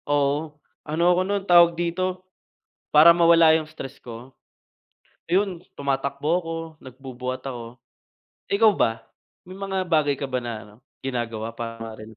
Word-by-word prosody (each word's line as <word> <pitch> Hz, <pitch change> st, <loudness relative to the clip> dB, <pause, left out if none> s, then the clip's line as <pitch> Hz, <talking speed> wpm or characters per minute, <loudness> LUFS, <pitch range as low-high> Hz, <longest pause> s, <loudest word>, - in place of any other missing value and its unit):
Oo. 145 Hz, +1 st, 0 dB, 0.2 s
Ano 170 Hz, +4 st, +2 dB
ako 180 Hz, -, +1 dB
nun, 200 Hz, +1 st, -1 dB
tawag 170 Hz, -2 st, +6 dB
dito, 185 Hz, +2 st, -2 dB, 0.6 s
para 155 Hz, +3 st, +8 dB
mawala 170 Hz, -1 st, +5 dB
yung 160 Hz, -1 st, 0 dB
stress 145 Hz, -4 st, -10 dB
ko, 120 Hz, +2 st, -11 dB, 1.0 s
ayun 185 Hz, 0 st, 0 dB, 0.2 s
tumatakbo 140 Hz, +1 st, -2 dB
ako, 165 Hz, -1 st, -6 dB, 0.3 s
nagbubuhat 130 Hz, -1 st, -7 dB
ako. 120 Hz, -3 st, -7 dB, 0.7 s
Ikaw 215 Hz, +2 st, +5 dB
ba, 115 Hz, -, -1 dB, 0.4 s
may 185 Hz, -, -11 dB
mga 190 Hz, -1 st, -3 dB
bagay 155 Hz, -5 st, +1 dB
ka 140 Hz, -, -3 dB
ba 130 Hz, -2 st, -3 dB
na 120 Hz, -1 st, -5 dB
ano, 105 Hz, -, -17 dB, 0.3 s
ginagawa 115 Hz, -3 st, -4 dB
para 115 Hz, -1 st, -7 dB
hindi 110 Hz, 0 st, -12 dB
145 Hz, 140 wpm, -24 LUFS, 125-175 Hz, 1.0 s, para